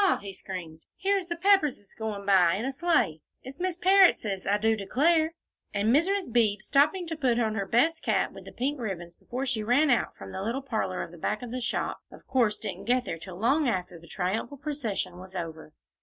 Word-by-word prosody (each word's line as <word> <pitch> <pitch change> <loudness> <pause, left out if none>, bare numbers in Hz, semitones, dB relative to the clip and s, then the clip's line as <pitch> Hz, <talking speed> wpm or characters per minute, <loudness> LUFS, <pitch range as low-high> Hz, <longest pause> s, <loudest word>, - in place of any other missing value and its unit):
he 200 -1 -8
screamed, 170 -5 -8 0.2
"here's 390 -2 0
the 345 - -2
Pepperses 335 - +2
goin' 215 -3 -4
by 185 -3 +5
in 215 +5 -3
a 270 - -1
sleigh; 245 - +1 0.2
it's 270 +5 -10
Miss 365 -1 -1
Parrottses, 360 - +4
I 205 +1 +3
do 220 +1 +2
declare." 315 - +2 0.4
And 215 +5 +3
Mrs. 370 - +1
Beebe, 215 -4 +3
stopping 295 - +2
to 325 -1 -4
put 255 -6 +1
on 220 -2 +1
her 200 -2 -2
best 320 +10 +2
cap - - +1
with - - -12
the - - -9
pink 275 +3 -2
ribbons 175 -7 -5
before 255 +9 -5
she 245 -4 -1
ran 260 +7 +3
out 240 - +1
from - - -9
the 190 - -5
little 235 +7 -2
parlor 220 -8 -2
back 210 +7 -2
of 240 - -7
the 255 +1 -3
shop, 245 - -2
of - - -14
course 240 -5 +2
didn't 195 -3 -6
get 250 +1 +2
there 165 - -4
till 175 +1 -9
long 270 - +2
after 180 -4 -3
the 170 - -16
triumphal 200 - -2
procession 235 - -3
was 185 +1 -11
over. 160 -3 -6
230 Hz, 205 wpm, -28 LUFS, 195-290 Hz, 0.4 s, by